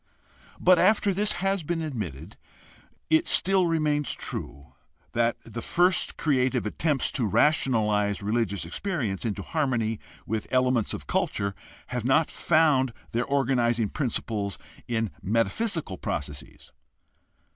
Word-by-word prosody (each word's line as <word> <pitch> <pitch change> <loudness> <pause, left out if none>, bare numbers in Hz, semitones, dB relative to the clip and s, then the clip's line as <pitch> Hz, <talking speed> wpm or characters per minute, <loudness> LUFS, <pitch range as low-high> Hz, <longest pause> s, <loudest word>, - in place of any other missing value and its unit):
But 180 -1 +5
after 205 +1 +4
this 205 +3 +1
has 195 -1 +1
been 165 +1 -2
admitted 100 - -5 0.8
it 160 - +4
still 190 -1 +4
remains 150 -3 0
true 70 -2 -7 0.4
that 120 0 +1
the 120 +1 -7
first 180 +1 +2
creative 130 -5 +1
attempts 140 +5 0
to 120 -5 0
rationalize 105 -6 +2
religious 105 -4 -1
experience 120 - -3
into 105 -3 -2
harmony 120 -8 -1 0.3
with 110 +1 -3
elements 125 -3 +2
of - - -9
culture 100 0 -1 0.4
have 125 -2 -3
not 135 +6 +3
found 150 -6 +3 0.2
their 120 +2 0
organizing 120 -5 +1
principles 110 -6 -2 0.3
in 115 -3 -1
metaphysical 115 - -1
processes. 70 -1 -6
125 Hz, 115 wpm, -26 LUFS, 105-155 Hz, 0.8 s, But